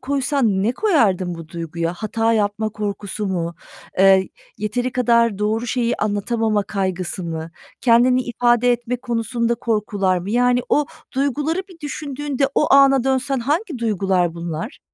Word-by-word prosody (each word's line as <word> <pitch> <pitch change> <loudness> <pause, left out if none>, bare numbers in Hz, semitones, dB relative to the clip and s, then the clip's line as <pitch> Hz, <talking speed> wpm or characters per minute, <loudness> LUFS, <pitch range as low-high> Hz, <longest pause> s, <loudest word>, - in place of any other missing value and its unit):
koysan 260 -7 0
ne 230 - +1
koyardın 210 - +1
bu 165 -1 -10
duyguya? 165 0 -3
Hata 225 +3 0
yapma 215 0 0
korkusu 205 -1 -4
mu? 170 -3 -2 0.5
Iıı, 195 0 +6 0.4
yeteri 240 +4 -2
kadar 235 -4 +2
doğru 220 +3 0
şeyi 240 0 0
anlatamama 210 +1 0
kaygısı 185 -2 -3
mı? 165 -1 -5 0.3
Kendini 250 +2 +4
ifade 240 0 +2
etme 240 +1 -2
konusunda 235 -1 -1
korkular 210 -5 0
mı? 185 +3 -6
Yani, 245 +2 +3
o 295 0 +2 0.3
duyguları 290 +6 0
bir 345 -3 -16
düşündüğünde 285 -2 -2
o - - +2
ana 275 -2 +5
dönsen 265 0 0
hangi 300 - -1
duygular 190 -6 0
bunlar? 170 - -5
230 Hz, 135 wpm, -20 LUFS, 195-255 Hz, 0.5 s, Iıı